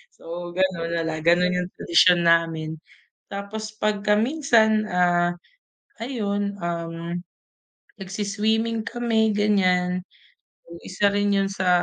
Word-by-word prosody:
so - - -19 0.3
ganun 185 -3 0
na 165 - 0
lang, 160 -1 -3
ganun 175 +1 +4
yung 180 0 -2
tradisyon 175 +1 +4
namin. 165 -2 +1 0.5
Tapos 215 +2 -6
pagka 210 -1 +1
minsan, 220 -5 +2
ah, 175 -1 +2 0.7
ayun 205 -5 -2
um, 170 0 -4 0.8
nag-swi-swimming 215 +4 -1
kami 225 -3 +1
ganyan, 185 -3 +2 0.7
yung 170 0 -11
isa 200 +2 +1
rin 205 0 +1
yun 195 0 +1
sa 185 -1 -1
195 Hz, 110 wpm, -23 LUFS, 175-215 Hz, 0.8 s, ganun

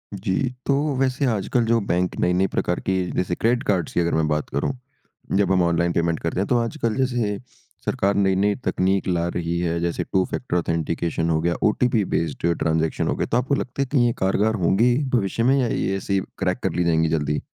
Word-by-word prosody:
जी। 95 0 -2 0.3
तो 140 - +2 0.2
वैसे 135 +1 +1
आजकल 115 +3 0
जो 115 +1 +3
बैंक 90 +1 0
नई-नई 90 +2 +2
प्रकार 90 - 0
के 95 - +1 0.2
जैसे 90 -1 0
क्रेडिट 120 +4 +1
कार्ड्स 90 -5 0
की - - +1
अगर 85 0 +1
मैं 80 -1 +1
बात 75 0 -1
करूँ। 70 - -1 0.7
जब 100 -1 +2
हम 95 -1 +3
ऑनलाइन 85 0 +1
पेमेंट 85 -1 0
करते 85 +2 -2
हैं, 100 - 0
तो 125 - +2
आजकल 115 -1 -1
जैसे 120 -6 0 0.5
सरकार 100 +1 +1
नई-नई 100 +1 +2
तकनीक 95 +2 +1
ला 85 -2 0
रही 85 0 -1
है 85 -1 -1
जैसे 85 0 -1
टू-फैक्टर 95 +1 0
ऑथेंटिकेशन 85 0 -1
हो 80 -1 +2
गया 85 +1 +1
ओटीपी 115 0 +2
बेस्ड 85 +1 -1
ट्रांजेक्शन 80 0 0
हो - - 0
गया - - -2
तो 120 - +3
आपको 135 +3 +1
लगता 130 0 -3
है 140 - +2
कि 130 -4 +3
ये 120 - +2
कारगर 105 +3 +1
होंगी, 115 +8 +3
भविष्य 115 -2 0
में 130 +3 +4
या 125 - +1
ये 95 -3 -1
ऐसे 100 - -3
ही 100 - +3 0.2
क्रैक 90 -1 0
कर - - 0
ली 90 - +1
जाएँगी 80 -1 +2
जल्दी? 75 -2 0
95 Hz, 210 wpm, -23 LUFS, 85-115 Hz, 0.7 s, में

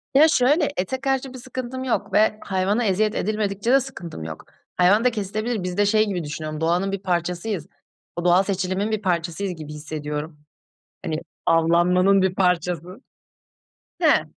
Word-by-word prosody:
Ya 305 +3 +8
şöyle, 290 +3 +3
ete 255 +9 -2
karşı 270 -1 -1
bir - - -8
sıkıntım 260 0 -5
yok 250 - -2
ve 215 0 +3
hayvana 195 +4 0
eziyet 210 +2 +1
edilmedikçe 210 +2 -1
de 270 - +6
sıkıntım 175 - -7
yok. 80 -1 -8 0.3
Hayvan 195 +6 +4
da 250 - +4
kesilebilir. 215 0 -3
Biz 180 +1 -4
de 205 - +4
şey 215 +1 +3
gibi 180 -4 -2
düşünüyorum, 155 +1 -5
doğanın 175 +4 +1
bir 195 - -2
parçasıyız. 180 0 -2 0.5
O 175 0 -4
doğal 180 +2 +5
seçilimin 195 +2 -1
bir 215 -1 -1
parçasıyız 180 0 -1
gibi 150 -1 -8
hissediyorum. 150 0 -5 0.7
Hani 160 -1 -2 0.3
avlanmanın 180 +4 +4
bir 190 -1 +1
parçası. 180 -1 0 1.0
He. - - +4
190 Hz, 155 wpm, -23 LUFS, 170-215 Hz, 1.0 s, Ya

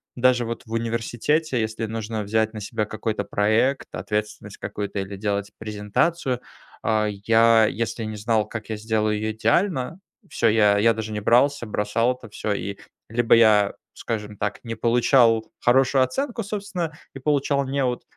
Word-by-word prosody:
даже 125 -1 +3
вот 115 +1 -5
в 110 - -15
университете, 115 +5 -1
если 110 +1 -2
нужно 110 -1 -4
взять 110 +2 0
на 105 - -6
себя 105 +2 -2
какой-то 110 +1 -3
проект, 110 +7 +1
ответственность 105 0 -4
какую-то 100 -1 -4
или 95 0 -5
делать 100 0 -2
презентацию, 110 +7 -1 0.4
а, 110 -1 +1
я 115 +2 +4
если 115 0 -3
не 110 0 -5
знал, 105 0 0
как 110 0 -7
я 110 - -3
сделаю 110 -1 0
ее 110 +1 -2
идеально, 165 - 0 0.3
всё, - - +1
я 105 -2 +4
я 115 +2 +4
даже 110 -1 -5
не 105 - -2
брался, 120 +4 +3
бросал 110 +4 0
это 125 - -13
всё. 105 0 -2
И, 100 0 -4 0.3
либо 115 0 +4
я, 105 -3 +5 0.2
скажем 105 -2 -5
так, 105 0 -2
не 115 -1 -5
получал 115 -1 +3
хорошую 130 +1 +4
оценку, 235 - -2
собственно, 195 -6 -4 0.2
и - - -6
получал 140 0 +1
"неуд", 130 -3 -1
115 Hz, 160 wpm, -23 LUFS, 105-125 Hz, 0.4 s, я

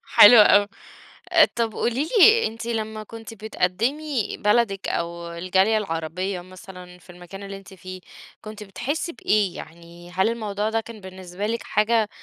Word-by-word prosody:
حلو 235 +3 +10
أوي، 205 -1 +6 0.7
آآ، 325 -2 +7
طب 230 -2 -1
قولي 260 +7 -2
لي 450 +4 +6
أنتِ 225 +1 -8
لمّا 220 -2 -4
كنتِ 225 +1 -11
بتقدمي 225 +6 -2
بلدِك 210 -2 +1
أو 170 0 -4
الجالية 190 +5 +1
العربية 180 0 -4
مثلًا 180 -1 -13
في 175 - -23
المكان 180 +3 -11
اللي 195 0 -7
أنتِ 195 0 -15
فيه، 185 0 -10 0.4
كنتِ 215 0 -9
بتحسي 280 - -4
بإيه، 205 -3 0
يعني 170 +2 -12
هل 190 +4 +1
الموضوع 215 -2 -3
ده 225 0 -1
كان 225 -2 -12
بالنسبة 190 +1 -7
لِك 230 +1 -3
حاجة 215 0 +1
205 Hz, 150 wpm, -23 LUFS, 185-225 Hz, 0.7 s, حلو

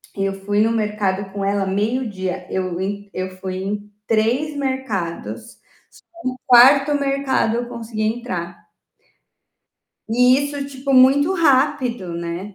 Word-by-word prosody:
Eu 195 0 -1
fui 205 0 +1
no 225 +1 +3
mercado 205 -3 -1
com 200 -1 -3
ela 200 0 0
meio-dia, 195 -3 -2
eu 185 -2 -2
ent 200 +1 -4
eu 185 0 -3
fui 185 0 -5
em 205 +1 -5 0.2
3 240 +7 +1
mercados, 260 -11 -4 0.7
só 255 - 0
no 255 - -12
4º 275 +4 +7
mercado 275 -4 0
eu 240 0 -3
consegui 225 -2 -5
entrar. 215 -7 -3 1.5
E 250 +3 +4
isso, 285 0 -3
tipo, 275 0 -4
muito 270 +6 +5
rápido, 260 - +1
né, 170 +4 -5
220 Hz, 130 wpm, -20 LUFS, 195-265 Hz, 1.5 s, 4º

